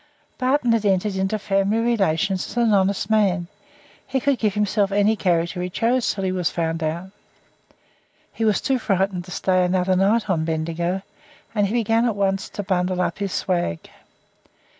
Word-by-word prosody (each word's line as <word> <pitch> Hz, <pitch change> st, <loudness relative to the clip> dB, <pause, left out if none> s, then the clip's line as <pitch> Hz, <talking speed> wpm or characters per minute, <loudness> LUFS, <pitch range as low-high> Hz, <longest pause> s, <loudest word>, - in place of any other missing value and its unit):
Barton 255 Hz, -1 st, +2 dB
had 230 Hz, -2 st, +2 dB
entered 195 Hz, 0 st, +1 dB
into 190 Hz, +3 st, 0 dB
family 195 Hz, +1 st, 0 dB
relations 195 Hz, -6 st, +1 dB
as -, -, -9 dB
an 230 Hz, -3 st, +3 dB
honest 195 Hz, -1 st, +1 dB
man; 200 Hz, -5 st, +2 dB, 0.6 s
he 265 Hz, 0 st, 0 dB
could 275 Hz, -1 st, +1 dB
give 210 Hz, -3 st, 0 dB
himself 205 Hz, -1 st, +1 dB
any 205 Hz, +2 st, +3 dB
character 175 Hz, -2 st, 0 dB
he 180 Hz, -, -3 dB
chose 235 Hz, +6 st, +1 dB
until 195 Hz, -, -5 dB
he 190 Hz, -, 0 dB
was 180 Hz, -3 st, 0 dB
found 165 Hz, -1 st, -2 dB
out. 170 Hz, +4 st, -3 dB, 1.2 s
He 225 Hz, -, -3 dB
was 215 Hz, -3 st, +2 dB
too 265 Hz, -1 st, 0 dB
frightened 190 Hz, -4 st, 0 dB
to -, -, -13 dB
stay 185 Hz, 0 st, +1 dB
another 180 Hz, +1 st, +1 dB
night 210 Hz, +4 st, +2 dB
on 170 Hz, -5 st, 0 dB
Bendigo, 170 Hz, +3 st, -2 dB, 0.5 s
and 205 Hz, -2 st, +2 dB
he 205 Hz, -, -4 dB
began 230 Hz, 0 st, +2 dB
at 230 Hz, -3 st, 0 dB
once 195 Hz, -1 st, -1 dB
to 205 Hz, -, -5 dB
bundle 185 Hz, -1 st, 0 dB
up 180 Hz, -, -1 dB
his 200 Hz, -2 st, -2 dB
swag. 175 Hz, -, -2 dB
195 Hz, 175 wpm, -22 LUFS, 180-215 Hz, 1.2 s, an